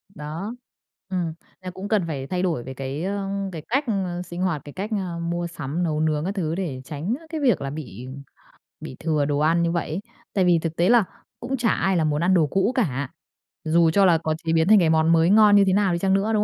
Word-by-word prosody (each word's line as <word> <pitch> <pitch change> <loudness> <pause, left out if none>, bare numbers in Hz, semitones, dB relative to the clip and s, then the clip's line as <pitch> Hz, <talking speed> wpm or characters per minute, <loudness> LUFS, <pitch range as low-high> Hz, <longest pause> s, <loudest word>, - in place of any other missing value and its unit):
Đó, 160 +9 -6 0.5
ừm, 175 -4 -2 0.3
là 185 - -6
cũng 190 +2 -7
cần 210 -3 +2
phải 135 -4 -4
thay 180 +3 -2
đổi 165 -10 -1
về 130 - -7
cái, 135 +4 -5
ơ, 195 +1 -2 0.2
cái 165 -3 -6
cách, 270 +5 +1
ơ, 185 -5 -2
sinh 175 0 -7
hoạt, 175 -6 0
cái 145 - -10
cách, 200 +4 -4
ơ, 185 -5 -3
mua 170 +1 -2
sắm, 165 0 -4
nấu 155 -3 -1
nướng 155 0 0
các 195 +2 -3
thứ 165 -4 -1
để 155 -9 -4
tránh, 155 - -3
a, 325 - -16
cái 315 -1 -4
việc 245 - +2
là 135 - -3
bị 130 -5 -8 0.7
bị - - -8
thừa 155 -3 0
đồ 145 0 0
ăn 165 +3 +3
như 170 - +1
vậy 170 -1 -2
ấy. 160 +4 -2 0.3
Tại 190 -2 +2
vì 175 -2 +4
thực 165 0 -4
tế 175 +3 +2
là 235 -3 +6 0.4
cũng 260 +3 -3
chả 235 -2 +1
ai 190 -3 +1
là 165 - +2
muốn 150 0 0
ăn 185 - +3
đồ 165 -5 +4
cũ 190 - +1
cả, 145 - -1 0.5
dù 165 +1 +3
cho 195 +4 +4
là 170 -3 +5
có 155 -1 -2
chế 160 - +1
biến 160 +1 +3
thành 215 -1 +7
cái 170 -3 +3
món 160 0 +3
mới 165 +1 +4
ngon 210 0 +6
như 200 - +7
thế 185 - +3
nào 200 -2 +2
đi 170 - -1
chăng 190 +1 +1
nữa, 200 +3 +1
đúng 210 -1 +2
170 Hz, 260 wpm, -23 LUFS, 155-195 Hz, 0.7 s, thành